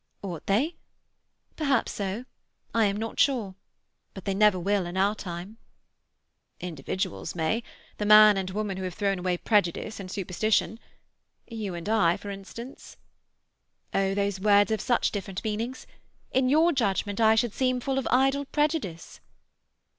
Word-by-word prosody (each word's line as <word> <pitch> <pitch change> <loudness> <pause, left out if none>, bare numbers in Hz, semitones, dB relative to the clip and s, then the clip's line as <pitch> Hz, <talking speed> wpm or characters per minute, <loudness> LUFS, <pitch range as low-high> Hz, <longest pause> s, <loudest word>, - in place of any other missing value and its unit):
"Ought 175 -5 -6
they? 270 - +1 0.8
Perhaps 275 -5 +1
so. 200 +4 -4 0.5
I 225 -1 +3
am 200 0 0
not 225 +1 -5
sure. 235 -9 +2 0.6
But 195 - -9
they 195 - 0
never 205 -1 +4
will 195 0 0
in 175 +2 -5
our 200 +2 +3
time." 185 +1 -7 1.0
"Individuals 160 - -4
may. 170 +8 0 0.4
The 210 - -1
man 215 0 +9
and 190 -1 -2
woman 200 0 -3
who 190 - -4
have 180 -1 -5
thrown 200 -2 0
away 180 0 0
prejudice 205 +1 0
and 190 -2 -7
superstition. 205 +4 0 0.7
You 215 -6 -5
and 170 +2 -7
I, 210 -6 +3
for 205 - -7
instance." 215 +6 -10 1.0
"Oh, 195 0 +1
those 200 -1 -1
words 205 +1 +4
have 220 -2 0
such 245 -2 +1
different 195 -2 -5
meanings. 225 +4 -3 0.5
In 255 -1 +2
your 320 +5 +4
judgment 205 - 0
I 220 0 +6
should 225 -1 +1
seem 255 -1 +1
full 270 +1 -1
of 270 - -3
idle 270 +2 +2
prejudice." 295 - -2
205 Hz, 150 wpm, -27 LUFS, 190-230 Hz, 1.0 s, man